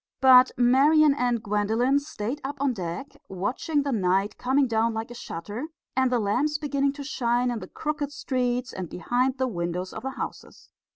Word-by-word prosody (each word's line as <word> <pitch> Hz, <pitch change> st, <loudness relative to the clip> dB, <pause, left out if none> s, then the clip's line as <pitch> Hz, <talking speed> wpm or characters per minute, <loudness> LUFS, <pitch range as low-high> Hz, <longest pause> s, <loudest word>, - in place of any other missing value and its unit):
But 255 Hz, -1 st, +7 dB
Marian 280 Hz, +5 st, +5 dB
and 245 Hz, -4 st, 0 dB
Gwendolen 220 Hz, +6 st, +1 dB
stayed 285 Hz, -2 st, -5 dB
up 280 Hz, +2 st, -4 dB
on 275 Hz, -2 st, +1 dB
deck, 180 Hz, +6 st, -6 dB
watching 250 Hz, -, -1 dB
the 280 Hz, -, -2 dB
night 195 Hz, -2 st, +1 dB
coming 265 Hz, +2 st, +2 dB
down 230 Hz, -1 st, +1 dB
like 225 Hz, +2 st, -4 dB
a -, -, -6 dB
shutter, 210 Hz, -, -6 dB, 0.3 s
and 260 Hz, -1 st, +2 dB
the 250 Hz, -, +3 dB
lamps 255 Hz, +8 st, 0 dB
beginning 280 Hz, -2 st, 0 dB
to 285 Hz, 0 st, -7 dB
shine 245 Hz, -3 st, 0 dB
in 235 Hz, -, -3 dB
the 185 Hz, -, -8 dB
crooked 295 Hz, -, -3 dB
streets 250 Hz, -3 st, -2 dB
and 180 Hz, -3 st, -5 dB
behind 250 Hz, +7 st, 0 dB
the 260 Hz, 0 st, 0 dB
windows 180 Hz, -3 st, -3 dB
of 220 Hz, -, -6 dB
the 265 Hz, -, -3 dB
houses. 265 Hz, -, -8 dB
250 Hz, 180 wpm, -26 LUFS, 215-275 Hz, 0.3 s, But